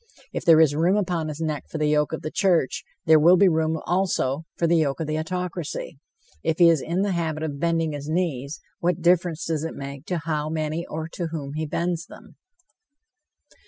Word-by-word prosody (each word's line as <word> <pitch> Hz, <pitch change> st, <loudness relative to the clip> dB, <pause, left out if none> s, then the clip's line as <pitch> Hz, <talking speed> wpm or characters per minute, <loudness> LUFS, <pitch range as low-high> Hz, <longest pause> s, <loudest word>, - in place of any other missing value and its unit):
If -, -, -3 dB
there 165 Hz, -2 st, +7 dB
is 155 Hz, -3 st, +5 dB
room 170 Hz, +6 st, +2 dB
upon 175 Hz, -5 st, -1 dB
his 155 Hz, 0 st, -6 dB
neck 155 Hz, -3 st, -2 dB
for -, -, -5 dB
the 150 Hz, -, 0 dB
yoke 150 Hz, 0 st, +2 dB
of 160 Hz, -, -5 dB
the 155 Hz, -, -4 dB
church, 180 Hz, -9 st, +1 dB, 0.2 s
there 160 Hz, -1 st, +6 dB
will 175 Hz, +4 st, +6 dB
be 200 Hz, -, +6 dB
room, 160 Hz, -1 st, +1 dB
also, 165 Hz, -5 st, 0 dB
for 170 Hz, -, +1 dB
the 170 Hz, 0 st, +3 dB
yoke 145 Hz, -3 st, 0 dB
of 160 Hz, -, -2 dB
the 155 Hz, +1 st, -2 dB
autocracy. 175 Hz, -4 st, -4 dB, 0.4 s
If 160 Hz, 0 st, 0 dB
he 170 Hz, -1 st, +7 dB
is 160 Hz, -4 st, +1 dB
in 175 Hz, +4 st, -1 dB
the 205 Hz, -, 0 dB
habit 160 Hz, -3 st, -2 dB
of 145 Hz, -3 st, -4 dB
bending 165 Hz, -1 st, +1 dB
his 145 Hz, 0 st, -6 dB
knees, 155 Hz, -5 st, -2 dB, 0.2 s
what 175 Hz, -1 st, 0 dB
difference 175 Hz, -2 st, +2 dB
does 160 Hz, -2 st, -1 dB
it 165 Hz, -, -4 dB
make 140 Hz, +1 st, -8 dB
to 180 Hz, -, -1 dB
how 155 Hz, -2 st, -2 dB
many 155 Hz, +1 st, -2 dB
or 160 Hz, +1 st, -4 dB
to 170 Hz, 0 st, -4 dB
whom 145 Hz, -4 st, -5 dB
he 155 Hz, +1 st, -3 dB
bends 170 Hz, +3 st, -2 dB
them? -, -, -15 dB
160 Hz, 210 wpm, -24 LUFS, 155-170 Hz, 0.4 s, there